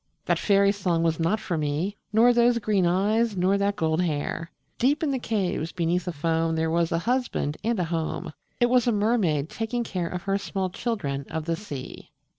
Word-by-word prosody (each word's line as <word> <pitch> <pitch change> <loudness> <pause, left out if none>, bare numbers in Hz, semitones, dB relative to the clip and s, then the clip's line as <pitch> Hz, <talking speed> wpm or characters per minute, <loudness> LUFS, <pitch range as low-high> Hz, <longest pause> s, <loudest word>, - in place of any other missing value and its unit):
That - - +1
fairy 200 -1 +4
song 180 -5 0
was 165 -1 +1
not 170 +7 +1
for 175 -6 -2
me, 155 +7 -1 0.2
Nor 230 +3 +5
those 240 0 +4
green 205 -5 +1
eyes, 205 +4 +1
nor 185 +2 +3
that 200 0 +1
gold 160 0 +1
hair; 165 0 -2 0.3
Deep 285 +6 +2
in 295 - +1
the 265 - -1
caves 190 -8 -1
beneath 175 0 0
the 180 - -2
foam 165 +1 0
There 160 0 0
was 170 0 +1
a 165 - +2
husband 240 - -1
and 230 -1 0
a - - +2
home 165 0 -3 0.3
It 240 0 +3
was 250 -1 +4
a - - +4
mermaid 205 -9 +1
taking 230 +5 -3
care 180 -6 -3
Of 180 +1 -5
her 195 0 0
small 190 -2 -3
children 140 - -3
of 160 -1 -4
the 165 0 0
sea. 145 -8 -8
185 Hz, 205 wpm, -26 LUFS, 165-220 Hz, 0.3 s, Nor